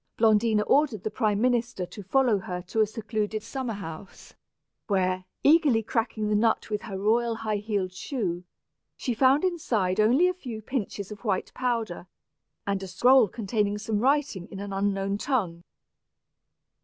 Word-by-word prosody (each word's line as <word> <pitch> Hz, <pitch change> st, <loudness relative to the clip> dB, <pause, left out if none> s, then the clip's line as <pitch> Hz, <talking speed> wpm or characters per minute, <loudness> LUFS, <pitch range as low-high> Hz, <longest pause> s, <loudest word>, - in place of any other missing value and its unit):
Blondina 220 Hz, -1 st, +3 dB
ordered 265 Hz, -6 st, +2 dB
the 215 Hz, -, -2 dB
prime 210 Hz, -4 st, 0 dB
minister 240 Hz, -5 st, 0 dB
to 205 Hz, -, -10 dB
follow 235 Hz, +1 st, +2 dB
her 180 Hz, -1 st, -5 dB
to 205 Hz, +5 st, 0 dB
a 215 Hz, -, +3 dB
secluded 215 Hz, -1 st, -3 dB
summer 245 Hz, -1 st, -4 dB
house, 190 Hz, -1 st, -9 dB, 0.5 s
where, 185 Hz, -2 st, 0 dB, 0.2 s
eagerly 285 Hz, -7 st, +5 dB
cracking 220 Hz, -1 st, -1 dB
the 210 Hz, -, 0 dB
nut 220 Hz, +1 st, +1 dB
with 210 Hz, -, -1 dB
her 200 Hz, -4 st, -6 dB
royal 230 Hz, +3 st, +1 dB
high 215 Hz, -1 st, -2 dB
heeled 200 Hz, -3 st, -2 dB
shoe, 185 Hz, -4 st, -3 dB, 0.5 s
she 250 Hz, -, -2 dB
found 265 Hz, +6 st, +4 dB
inside 230 Hz, -, 0 dB
only 250 Hz, +12 st, +5 dB
a 365 Hz, -, +1 dB
few 250 Hz, -11 st, -7 dB
pinches 215 Hz, -3 st, -4 dB
of 210 Hz, +1 st, -9 dB
white 195 Hz, -5 st, -1 dB
powder, 230 Hz, -8 st, -2 dB, 0.6 s
and 200 Hz, -1 st, -1 dB
a 190 Hz, -, -6 dB
scroll 245 Hz, +6 st, +5 dB
containing 205 Hz, 0 st, -1 dB
some 215 Hz, 0 st, -2 dB
fine -, -, -1 dB
writing 270 Hz, -9 st, +1 dB
in 195 Hz, -, -8 dB
an 200 Hz, 0 st, -5 dB
unknown 195 Hz, 0 st, -1 dB
tongue. 190 Hz, -12 st, -1 dB
215 Hz, 160 wpm, -27 LUFS, 195-240 Hz, 0.6 s, eagerly